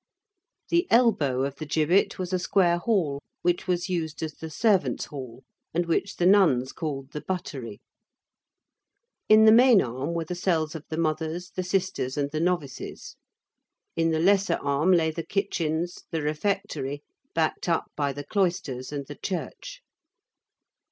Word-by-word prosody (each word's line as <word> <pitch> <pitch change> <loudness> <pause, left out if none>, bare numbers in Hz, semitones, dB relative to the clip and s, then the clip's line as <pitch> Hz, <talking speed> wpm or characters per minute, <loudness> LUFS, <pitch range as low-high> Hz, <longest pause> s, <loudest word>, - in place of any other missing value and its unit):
The 340 +1 +2
elbow 195 - +3
of 140 0 -3
the 155 - -5
gibbet 160 +5 +2
was 185 0 -4
a 185 - +2
square 175 -2 +2
hall 170 -10 0 0.2
which 175 +2 +1
was 180 0 0
used 165 -4 -3
as 155 -1 -4
the 160 - -8
servants' 185 - +1
hall, 130 -3 -9 0.3
and 175 +1 +1
which 170 +4 -1
the 175 - 0
nuns 165 -10 +4
called 140 -3 -5
the 150 - -5
buttery. 135 - -5 1.5
In 215 0 +8
the 220 - +8
main 240 -1 +7
arm 130 +4 -2
were 165 -1 -2
the 180 - -4
cells 165 -3 0
of 160 -2 -8
the 160 - -4
mothers, 160 +2 -2
the - - -3
sisters, 180 -8 -1
and 140 -1 -1
the 155 - -2
novices. 170 -7 -3 0.8
In 165 0 +2
the 160 - +1
lesser 190 0 +3
arm 140 +6 +2
lay 165 -3 +3
the 165 - -4
kitchens, 170 -2 -2
the 160 -3 -2
refectory, 150 -3 -2 0.3
backed 160 +2 0
up 165 - 0
by 145 -2 0
the 145 +1 -6
cloisters 175 -10 -1
and 140 -1 -4
the 145 +1 -10
church. 350 - -5
165 Hz, 160 wpm, -26 LUFS, 145-185 Hz, 1.5 s, In